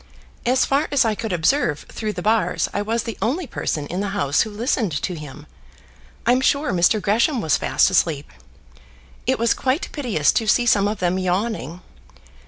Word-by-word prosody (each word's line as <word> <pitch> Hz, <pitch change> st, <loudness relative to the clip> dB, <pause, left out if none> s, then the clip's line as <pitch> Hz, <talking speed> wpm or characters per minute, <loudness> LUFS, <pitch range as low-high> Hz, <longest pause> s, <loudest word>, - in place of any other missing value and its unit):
As 255 Hz, +1 st, +3 dB
far 280 Hz, +3 st, +1 dB
as 285 Hz, -4 st, +3 dB
I 220 Hz, -, +1 dB
could 225 Hz, 0 st, -4 dB
observe 170 Hz, -, +1 dB
through 215 Hz, -2 st, -4 dB
the -, -, -6 dB
bars 220 Hz, +1 st, +1 dB
I 205 Hz, -, -1 dB
was 225 Hz, +3 st, -1 dB
the 230 Hz, -2 st, -6 dB
only 275 Hz, -, -1 dB
person 155 Hz, -, -3 dB
in 175 Hz, +5 st, -4 dB
the 205 Hz, -, -1 dB
House 140 Hz, -6 st, +2 dB
who 220 Hz, -, -1 dB
listened 210 Hz, -, -1 dB
to 180 Hz, -, -3 dB
him. 150 Hz, -2 st, -9 dB, 0.8 s
I'm 250 Hz, +2 st, +3 dB
sure 280 Hz, +3 st, +1 dB
Mr. 180 Hz, +4 st, +3 dB
Gresham 230 Hz, -, +1 dB
was 160 Hz, -8 st, +2 dB
fast -, -, +2 dB
asleep. 160 Hz, -6 st, 0 dB, 1.0 s
It -, -, +2 dB
was 235 Hz, +1 st, +2 dB
quite 265 Hz, +5 st, -1 dB
piteous 220 Hz, -, +1 dB
to 225 Hz, -, -1 dB
see 240 Hz, +3 st, +3 dB
some 205 Hz, -4 st, +3 dB
of 210 Hz, -1 st, -4 dB
them 180 Hz, +1 st, +1 dB
yawning. 185 Hz, -, -2 dB
215 Hz, 185 wpm, -21 LUFS, 175-240 Hz, 1.0 s, As